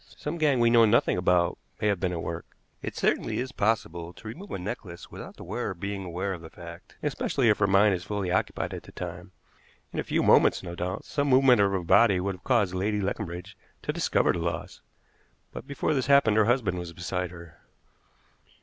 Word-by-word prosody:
"Some 160 +3 -4
gang 145 -5 +3
we 120 0 +4
know 115 -1 +7
nothing 110 +2 +3
about 90 -1 +2 0.2
may - - -2
have 100 -3 +1
been 90 -1 0
at 85 -2 -4
work. 85 -5 -6 0.2
It - - -5
certainly - - 0
is 130 +2 -3
possible 90 -7 -1
to 105 +4 -12
remove 175 - -8
a - - -3
necklace 90 -2 -7
without - - -9
the - - -9
wearer 95 - -3
being 100 +2 -4
aware 90 +3 -3
of 85 - -8
the 80 - -10
fact, 85 0 -12
especially 135 -3 +1
if 105 - +3
her 100 - +3
mind 100 +1 +5
is 90 -1 -3
fully 100 -2 -3
occupied 95 - -1
at - - -5
the - - -14
time. 90 +1 -7 0.6
In - - -3
a - - 0
few - - 0
moments, - - +5
no 85 -1 -6
doubt, 90 +1 -4
some 145 -1 -1
movement 130 -4 +5
of 100 -1 +3
her 95 -2 -1
body 100 +2 +5
would 100 +2 -1
have 90 +1 -13
caused 110 -8 +2
Lady 105 +3 0
Leconbridge 95 -2 -4 0.3
to - - -2
discover - - +2
the - - -3
loss, 85 0 -4 0.7
but - - -8
before 140 +2 -1
this 130 -3 0
happened 140 -7 +5
her 110 -1 +5
husband 110 -7 +1
was 85 -1 -7
beside 90 +1 -3
her." 85 -2 -12
95 Hz, 215 wpm, -27 LUFS, 90-115 Hz, 0.7 s, know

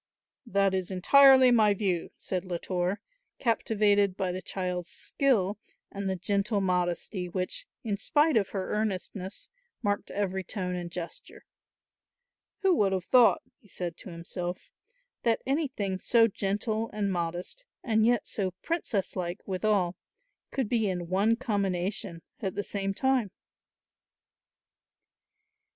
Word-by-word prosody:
"That 195 -2 +2
is 185 -2 -1
entirely 260 +7 +7
my 215 -4 +5
view," 185 -4 -1
said 185 -2 -3
Latour, 180 +1 -2 0.4
captivated 205 -4 +2
by 185 -1 0
the 185 +1 -4
child's 180 -2 -3
skill 215 -8 0 0.3
and 200 -1 -3
the 190 - 0
gentle 200 +3 0
modesty 180 0 -1
which, 185 - -3 0.2
in 210 -4 -1
spite 300 +7 +3
of 205 -4 +2
her 190 -2 -3
earnestness, 200 -2 -3 0.4
marked 205 -1 -1
every 190 -2 -2
tone 185 -2 -3
and 175 -1 -4
gesture. 170 0 -8 1.2
"Who 380 -2 +5
would 195 -2 +3
have 185 -2 -2
thought," 245 -2 +5 0.2
he - - -23
said 175 -3 -5
to - - -10
himself, 175 +1 -6 0.5
"that 230 -1 +1
anything 260 - -1
so 230 +2 +4
gentle 215 +2 -1
and 200 -2 -1
modest 175 - -4 0.2
and 220 -3 +2
yet 240 0 +3
so 190 -3 -2
princess 285 - -1
like 180 0 -4
withal 185 -2 +1 0.5
could 265 -5 -1
be 220 -2 +1
in 175 -2 -3
one 200 +5 +3
combination 195 -7 -2 0.2
at 190 -3 -2
the 205 - -1
same 195 -1 -3
time?" 265 -4 +1
200 Hz, 130 wpm, -29 LUFS, 185-220 Hz, 1.2 s, entirely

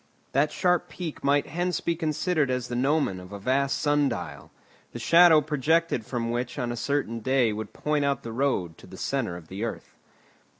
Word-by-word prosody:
That 145 +3 +2
sharp 180 -2 +1
peak 160 -1 -6
might 140 +1 +3
hence 175 +2 -1
be 170 - -1
considered 160 -2 0
as 125 -1 -2
the 120 - -3
gnomon 135 -6 +1
of 90 +1 -12
a 100 - -6
vast 135 +6 +1
sun 145 -1 +2
dial, - - -6 0.4
the - - -5
shadow 170 -2 +6
projected 150 -3 0
from 115 -2 -2
which 120 +3 -3
on 120 -3 -2
a - - -3
certain 120 -2 -1
day 125 -1 +2
would 105 -1 -6
point 150 -1 -1
out 140 -1 0
the 115 - -6
road 115 -10 -1
to - - -14
the - - -11
centre 120 -11 -2
of 85 -2 -13
the 95 +5 -5
earth. 115 - -5
140 Hz, 200 wpm, -26 LUFS, 115-155 Hz, 0.4 s, shadow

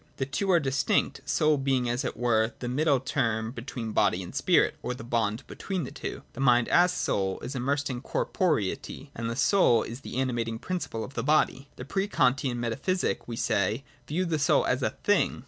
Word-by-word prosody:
The 135 - -1
two 165 +9 -2
are 175 -2 +5
distinct, 140 -1 0
soul 155 -2 +3
being 135 -2 +1
as 120 +3 -1
it 130 - -4
were 115 -1 +2
the 125 - -5
middle 140 +2 +2
term 115 -4 -1
between 120 -2 -6
body 95 -3 +2
and 90 - -9
spirit, - - +3
or 125 - -3
the 115 - -9
bond 115 -1 -1
between 190 -4 -4
the 125 - -6
two. - - -6
The - - -10
mind, 125 -3 +4
as 180 +1 +5
soul, 95 - -1
is 130 - -5
immersed 140 +3 -1
in 125 -2 -4
corporeity, 140 - -1
and 115 0 -3
the 115 - -3
soul 130 - +4
is 120 +4 -7
the 130 - -6
animating 120 -3 -1
principle 140 -7 -4
of 130 - -8
the - - -2
body. 140 -2 +2
The 125 - -8
pre 195 +7 -1
Kantian 130 -8 +1
metaphysic, 135 +11 -1
we 120 - -4
say, 105 +3 0 0.2
viewed 170 +3 -1
the 155 - +1
soul 145 - +3
as - - 0
a - - +1
thing. - - +2
130 Hz, 200 wpm, -28 LUFS, 115-145 Hz, 0.2 s, are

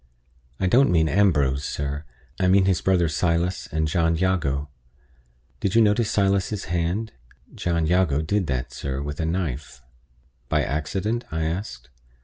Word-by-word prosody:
I 95 - 0
don't 125 +9 +4
mean 80 -3 +3
Ambrose, 75 -8 +2
sir; 70 +1 -4 0.3
I 95 - +2
mean 95 +1 +5
his 95 -3 +2
brother 90 -3 +2
Silas, 85 +3 0
and 80 0 0
John 80 +1 +1
Jago. 80 -6 0 0.9
Did 100 0 -1
you 115 - +6
notice 105 +1 +2
Silas's 100 -1 +1
hand? 90 +6 -1 0.4
John 85 -2 -1
Jago 80 -4 +2
did 95 +2 0
that, 65 -3 -2
sir, 65 -1 -4
with 75 0 -5
a 80 - 0
knife." 70 -7 -3 0.7
"By - - +2
accident?" 95 - -2
I 80 0 -1
asked. 80 - -4
85 Hz, 145 wpm, -24 LUFS, 75-95 Hz, 0.9 s, you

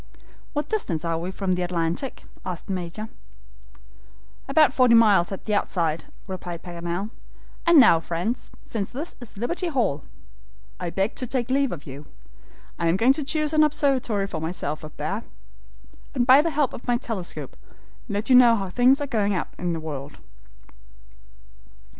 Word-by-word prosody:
"What 295 0 -2
distance 175 - -2
are 165 -1 0
we 175 +2 -4
from 190 0 -2
the 180 0 +1
Atlantic?" 175 +7 -2 0.2
asked 180 -3 -5
the 195 - -3
Major. 185 +4 -5 1.4
"About 305 +2 +4
forty 250 -3 +5
miles 205 -6 +5
at 195 - -6
the 215 - -1
outside," 170 -5 0 0.2
replied 180 -3 -6
Paganel; 175 +4 -4 0.6
"and 340 -3 +8
now, 170 -10 +7
friends, 175 +9 -3
since 205 -4 -4
this 295 +7 -5
is 230 -4 -11
Liberty 340 - -2
Hall, 235 - 0 0.8
I 175 - -3
beg 195 +5 -1
to 255 - -1
take 250 0 -2
leave 275 -1 +2
of 160 -4 -7
you. 140 +2 -9 0.7
I 170 - +1
am 165 +3 +3
going 245 +6 +5
to 300 - -2
choose 305 +1 0
an 310 - +5
observatory 265 -9 +1
for 170 -5 -5
myself 160 -2 -3
up 155 - -10
there, - - -3 0.9
and 245 -2 +2
by 260 +3 +8
the 335 - 0
help 295 -4 0
of 240 - -9
my 240 -1 +3
telescope, 220 -8 -5 0.5
let 205 +1 -2
you 260 - +6
know 240 -2 +8
how 195 -3 -3
things 250 +7 +4
are - - 0
going 210 -7 0
on 180 - -1
in 175 -1 -1
the 165 - -3
world." 145 -2 -7
205 Hz, 170 wpm, -24 LUFS, 170-255 Hz, 1.4 s, and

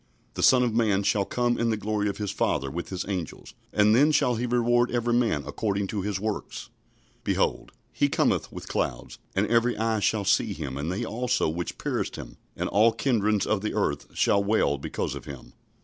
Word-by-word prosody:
"The - - -4
Son 125 -1 +6
of 120 -3 0
man 105 -4 +2
shall 100 0 +1
come 120 +2 0
in 115 0 +1
the 110 - 0
glory 105 0 -1
of 100 - -4
his 105 -2 -3
Father 70 0 -1
with 85 +2 -5
his 95 -2 -4
angels; 90 -7 -5 0.2
and 105 +1 +4
then 145 +5 +5
shall 125 -4 +3
he 120 +2 -2
reward 120 0 +2
every 120 0 0
man 115 -12 +1
according 100 +7 -2
to 105 - -2
his 100 0 -2
works." 110 0 -5 0.5
"Behold, - - 0 0.2
he - - +2
cometh - - +1
with - - -9
clouds; - - -3 0.2
and 95 +2 +2
every 115 +2 +2
eye 110 0 0
shall 100 +1 0
see 100 - +2
him, 70 -4 -5
and 75 +5 -3
they 105 +6 -2
also 125 +3 0
which 85 +2 -4
pierced - - -2
him: - - -9 0.2
and - - -2
all 110 +4 +4
kindreds 110 -4 +1
of 105 -2 0
the 105 - -3
earth 70 0 -1
shall 100 0 +3
wail 100 -9 +1
because - - -3
of - - -8
him." 70 -3 -10
105 Hz, 205 wpm, -26 LUFS, 95-115 Hz, 0.5 s, Son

